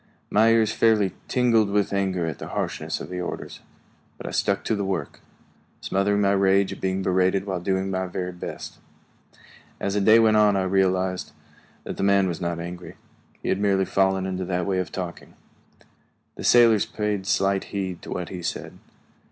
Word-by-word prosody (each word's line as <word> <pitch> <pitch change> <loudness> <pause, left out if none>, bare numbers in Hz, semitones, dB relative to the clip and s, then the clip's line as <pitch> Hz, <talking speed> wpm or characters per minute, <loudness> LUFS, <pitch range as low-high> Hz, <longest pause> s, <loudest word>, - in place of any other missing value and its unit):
My 110 +2 +5
ears 115 -2 +3
fairly 110 -4 +2
tingled 115 -4 +3
with 100 0 0
anger 95 -3 0
at 80 -3 -5
the - - -6
harshness - - -3
of - - -8
the 90 0 -3
orders, 90 - -6 0.6
but - - -10
I - - -4
stuck - - 0
to - - -1
the 100 - -2
work, 95 -3 -3 0.6
smothering 100 +1 0
my 100 -1 +3
rage 100 0 +3
at - - -12
being 95 0 -1
berated 95 +1 +1
while 95 -3 -2
doing 95 +1 -1
my 95 0 -2
very 90 0 -4
best. 90 - -8 1.0
As 100 - -2
the 105 - +1
day 110 +3 +6
went 110 -1 +4
on 105 -1 +4
I 95 - +1
realized 95 -1 0 0.5
that - - -6
the - - -3
man 100 -1 +4
was 85 -2 -4
not 85 -1 -2
angry; 90 +1 -7 0.5
he - - -2
had 95 - +1
merely 100 -2 +2
fallen 95 -1 +1
into 95 0 -3
that 90 -1 -1
way 95 -2 0
of 90 - -3
talking. 90 -3 -7 1.0
The - - -9
sailors 115 -4 +5
paid 105 -3 -3
slight 95 -1 +1
heed 95 -3 -4
to - - -11
what 90 -1 -4
he 90 -2 -6
said. - - -5
95 Hz, 185 wpm, -24 LUFS, 95-100 Hz, 1.0 s, day